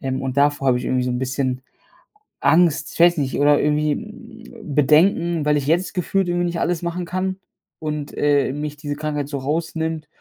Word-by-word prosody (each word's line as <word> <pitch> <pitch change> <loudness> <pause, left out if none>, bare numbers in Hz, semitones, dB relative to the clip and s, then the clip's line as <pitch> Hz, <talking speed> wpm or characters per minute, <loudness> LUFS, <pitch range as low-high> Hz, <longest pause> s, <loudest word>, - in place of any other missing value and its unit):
ähm, 130 0 -3
und 130 0 -3
davor 145 -1 +2
habe 125 -1 +3
ich - - -6
irgendwie 130 -1 0
so 125 - -1
'n 125 - -1
bisschen 130 0 -2 0.8
Angst 155 -2 +3
ich - - -10
weiß 175 0 +6
nicht, 135 -2 -1
oder 145 0 +4
irgendwie, 150 0 +1 0.6
hm, 195 -11 -8
Bedenken, 165 +2 +3
weil 150 0 +3
ich 140 -1 -3
jetzt 175 +5 +1
gefühlt 190 +1 0
irgendwie 175 0 0
nicht 170 -1 -3
alles 175 0 0
machen 175 +1 -3
kann 185 +2 -2 0.4
und, 150 -2 -4
äh, 145 -2 +2
mich 150 0 -5
diese 145 -1 -4
Krankheit 150 -1 -3
so 140 - -3
rausnimmt 160 +2 -3
150 Hz, 195 wpm, -21 LUFS, 140-170 Hz, 0.8 s, weiß